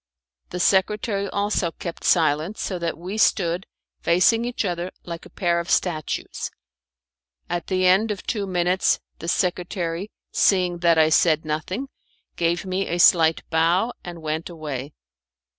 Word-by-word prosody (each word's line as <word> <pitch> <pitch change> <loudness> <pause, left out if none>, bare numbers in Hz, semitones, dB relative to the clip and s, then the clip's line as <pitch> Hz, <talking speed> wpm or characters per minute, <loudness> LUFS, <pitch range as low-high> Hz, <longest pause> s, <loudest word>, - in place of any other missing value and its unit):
The 180 - -5
secretary 200 +2 +1
also 200 -3 0
kept 170 -2 -7
silence, 160 +4 +2
so 185 -3 -3
that 170 -1 -2
we 185 +6 -5
stood 180 -3 +2 0.3
facing 205 +7 +3
each 245 -3 -2
other 175 -1 -2 0.2
like 170 -1 -7
a - - -20
pair 170 -2 0
of 170 - -5
statues. 155 -5 -1 1.0
At 175 -2 -3
the 185 -1 +1
end 190 +5 +4
of 205 -2 -4
two 205 -4 -2
minutes, 180 0 +1 0.2
the 165 - -7
secretary, 180 +1 -1 0.2
seeing 180 -3 +2
that 170 -2 +4
I 155 0 +5
said 160 0 +3
nothing, 155 - -3 0.5
gave 170 +2 0
me 190 +1 -1
a 175 - -2
slight 165 -2 +5
bow, 170 +8 +2
and 170 -2 -8
went 155 +2 -3
away. 150 -4 -6
175 Hz, 145 wpm, -23 LUFS, 165-190 Hz, 1.0 s, I